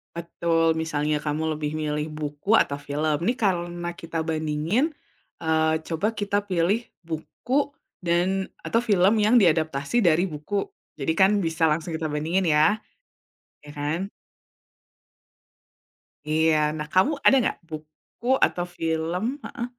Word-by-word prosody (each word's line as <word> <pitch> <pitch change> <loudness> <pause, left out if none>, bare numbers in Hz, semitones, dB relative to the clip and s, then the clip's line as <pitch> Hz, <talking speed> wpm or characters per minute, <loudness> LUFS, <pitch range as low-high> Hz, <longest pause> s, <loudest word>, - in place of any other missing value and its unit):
Betul, 165 -1 +1
misalnya 150 -2 -1
kamu 155 +1 -1
lebih 150 -1 -3
milih 150 0 -2
buku 150 +5 -4
atau 140 - +1
film. 150 +2 -1
Ini 235 - +2
karena 175 -3 -1
kita 165 -2 -5
bandingin, 160 - 0 0.5
eee, 160 0 +2
coba 175 +7 0
kita 205 -2 -1
pilih 195 +4 +1 0.2
buku 240 - -2 0.3
dan 180 +3 0
atau 230 +1 0
film 200 -3 +4
yang 230 +4 +6
diadaptasi 160 +2 +2
dari 175 +1 +3
buku, 185 +5 -3 0.3
jadi 145 +3 0
kan 190 +3 +5
bisa 165 -3 -1
langsung 160 +2 -1
kita 160 -1 -3
bandingin 160 +6 0
ya? 155 +4 +4 0.9
Ya 150 - -12
kan? 145 +3 -2 2.3
Iya. 160 +1 +3 0.2
Nah 150 -1 -4
kamu 185 +10 +4
ada - - +7
gak - - -8
buku 155 +8 -10 0.2
atau 175 - -3
film 165 +3 -1 0.2
heeh? 240 - -5
165 Hz, 125 wpm, -25 LUFS, 155-190 Hz, 2.3 s, ada